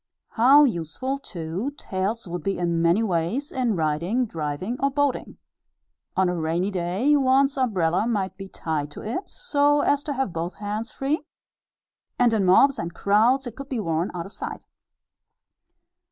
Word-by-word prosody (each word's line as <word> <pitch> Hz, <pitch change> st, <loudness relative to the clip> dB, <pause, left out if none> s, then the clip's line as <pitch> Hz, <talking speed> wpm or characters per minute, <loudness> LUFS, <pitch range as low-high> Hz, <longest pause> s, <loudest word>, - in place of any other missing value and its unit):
How 270 Hz, +6 st, +6 dB
useful, 255 Hz, -, -1 dB
too, 185 Hz, -, -5 dB
tails 195 Hz, +2 st, -3 dB
would 175 Hz, 0 st, -4 dB
be 195 Hz, +4 st, -1 dB
in 170 Hz, -1 st, 0 dB
many 170 Hz, +6 st, +3 dB
ways 205 Hz, -, -1 dB
in 245 Hz, -5 st, 0 dB
riding, 170 Hz, +10 st, 0 dB
driving, 165 Hz, +5 st, -4 dB
or 275 Hz, -, +2 dB
boating! 285 Hz, -1 st, -1 dB, 0.8 s
On 190 Hz, -1 st, +4 dB
a 180 Hz, -, 0 dB
rainy 170 Hz, +4 st, -1 dB
day, 190 Hz, +10 st, +1 dB
one's 275 Hz, 0 st, +3 dB
umbrella 205 Hz, -7 st, +1 dB
might 200 Hz, -5 st, -1 dB
be 195 Hz, -1 st, -8 dB
tied 155 Hz, -5 st, -3 dB
to -, -, -8 dB
it, 240 Hz, -, -4 dB
so 290 Hz, -10 st, +2 dB
as 285 Hz, 0 st, +2 dB
to 290 Hz, -, -2 dB
have 265 Hz, -9 st, -2 dB
both 165 Hz, +2 st, -3 dB
hands 210 Hz, +3 st, -4 dB
free; 285 Hz, +4 st, -1 dB, 1.0 s
and 240 Hz, -2 st, +3 dB
in 205 Hz, -3 st, +2 dB
mobs 270 Hz, +10 st, +5 dB
and 170 Hz, 0 st, -5 dB
crowds 230 Hz, +7 st, +3 dB
it 240 Hz, -2 st, -7 dB
could 275 Hz, -1 st, -9 dB
be 255 Hz, -, -2 dB
worn 165 Hz, -3 st, -1 dB
out 170 Hz, -1 st, -4 dB
of 195 Hz, -, -11 dB
sight. -, -, -6 dB
205 Hz, 165 wpm, -24 LUFS, 170-265 Hz, 1.0 s, How